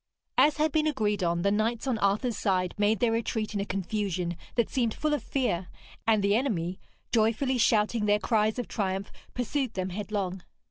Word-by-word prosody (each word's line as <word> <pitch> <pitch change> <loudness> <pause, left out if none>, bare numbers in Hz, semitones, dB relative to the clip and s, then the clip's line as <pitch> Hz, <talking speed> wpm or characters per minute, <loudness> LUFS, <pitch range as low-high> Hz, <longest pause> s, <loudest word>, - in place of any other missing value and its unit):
As 300 0 +4
had 310 0 +2
been 310 +1 +2
agreed 210 -8 0
on, 170 0 +1
the 200 - +3
knights 220 +3 0
on 250 -5 0
Arthur's 210 +4 +1
side 185 -2 0
made 210 +1 +2
their 240 -2 +3
retreat 225 -1 -1
in 205 - -1
a 200 - -1
confusion 185 -3 -2 0.2
that 235 -3 +2
seemed 235 -4 0
full 305 0 0
of 295 - 0
fear; 190 -10 -1 0.4
and 215 -3 +4
the 200 +1 +3
enemy, 185 -8 -1 0.3
joyfully 235 +3 +2
shouting 215 -1 +2
their 205 0 +4
cries 215 0 +1
of 245 - -3
triumph, 195 -1 -2 0.2
pursued 250 0 -1
them 185 0 -2
headlong. 195 -1 -3
215 Hz, 185 wpm, -28 LUFS, 195-240 Hz, 0.4 s, As